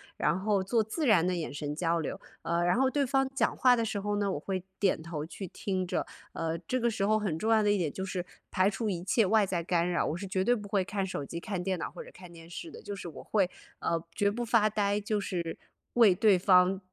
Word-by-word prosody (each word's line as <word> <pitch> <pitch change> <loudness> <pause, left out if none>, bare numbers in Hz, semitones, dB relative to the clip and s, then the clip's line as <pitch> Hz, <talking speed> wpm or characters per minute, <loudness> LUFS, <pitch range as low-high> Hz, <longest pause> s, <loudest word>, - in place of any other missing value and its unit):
然 170 +5 +1
后 200 -1 +1
做 225 +4 +2
自 260 +9 -2
然 200 -9 +5
的 185 - +1
眼 165 -4 -4
神 145 0 -4
交 170 +1 +1
流。 155 - -4 0.2
呃， 170 +1 0
然 175 +5 +2
后 265 +1 +3
对 280 +1 +1
方 270 +1 +2
讲 240 -4 +1
话 250 -1 +6
的 230 - 0
时 210 -2 -2
候 205 +1 -1
呢， 200 -1 0
我 - - -2
会 190 -2 -3 0.2
点 195 -5 +2
头 160 -2 -5
去 190 +4 -7
听 185 +1 -2
着， 180 - -1 0.3
呃， 165 0 -2
这 255 +9 -2
个 235 0 +2
时 210 -3 -1
候 215 +1 +3
很 190 -7 -1
重 220 +6 0
要 220 -1 +5
的 210 - +2
一 205 - +3
点 165 -6 -1
就 190 - -4
是 185 -2 -3 0.3
排 185 +1 +3
除 210 +2 -2
一 175 -3 -3
切 210 +4 +3
外 210 +2 +4
在 185 -3 -1
干 175 0 +1
扰， 175 - +1
我 155 - -1
是 195 - -5
绝 185 0 0
对 245 - +4
不 205 -3 -7
会 195 -2 +1
看 195 0 -2
手 165 -6 -4
机 170 - -5
看 195 -3 -3
电 185 0 -1
脑 - - -4
或 - - -8
者 - - -12
看 180 -2 -12
电 165 0 -13
视 320 - -7
的， - - -11
就 205 - -6
是 180 -3 -7
我 145 - -10
会， 195 -4 +1 0.3
呃， 165 -1 0
绝 205 -1 +2
不 240 +3 -3
发 225 -2 +4
呆， 205 0 0
就 210 +1 -1
是 175 -4 -3 0.4
为 220 -7 +6
对 200 -2 +4
方， 185 0 +5
195 Hz, 285 characters per minute, -30 LUFS, 175-215 Hz, 0.4 s, 话